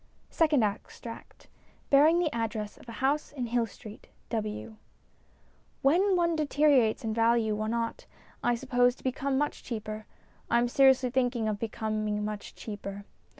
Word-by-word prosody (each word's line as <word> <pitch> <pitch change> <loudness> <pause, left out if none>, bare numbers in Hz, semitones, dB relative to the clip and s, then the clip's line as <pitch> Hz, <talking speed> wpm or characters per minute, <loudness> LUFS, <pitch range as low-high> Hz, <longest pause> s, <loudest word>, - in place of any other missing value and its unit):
SECOND 300 -7 +3
EXTRACT 215 +2 -6 0.4
(Bearing 300 +4 +6
the 345 -4 +1
Address 220 -2 -3
of - - -14
a 230 - -7
House 290 +3 +1
in 260 -4 -4
Hill 235 0 0
Street, 215 +1 -12 0.2
W.) 215 0 -4 1.1
WHEN 365 +8 +4
one 340 -1 +2
deteriorates 290 -6 +3
in 220 -1 -1
value 225 -1 +2
one 215 +2 -2
ought, 235 - -3 0.4
I 240 0 +3
suppose, 245 0 +2
to - - -20
become 265 +1 -1
much 295 +1 -1
cheaper. 215 -2 -6 0.4
I 235 - +3
am 240 +1 +3
seriously 265 -1 +4
thinking 245 -3 +1
of 210 -1 -2
becoming 215 -1 -2
much 210 -1 -6
cheaper. 200 -2 -7
235 Hz, 150 wpm, -29 LUFS, 215-275 Hz, 1.1 s, Bearing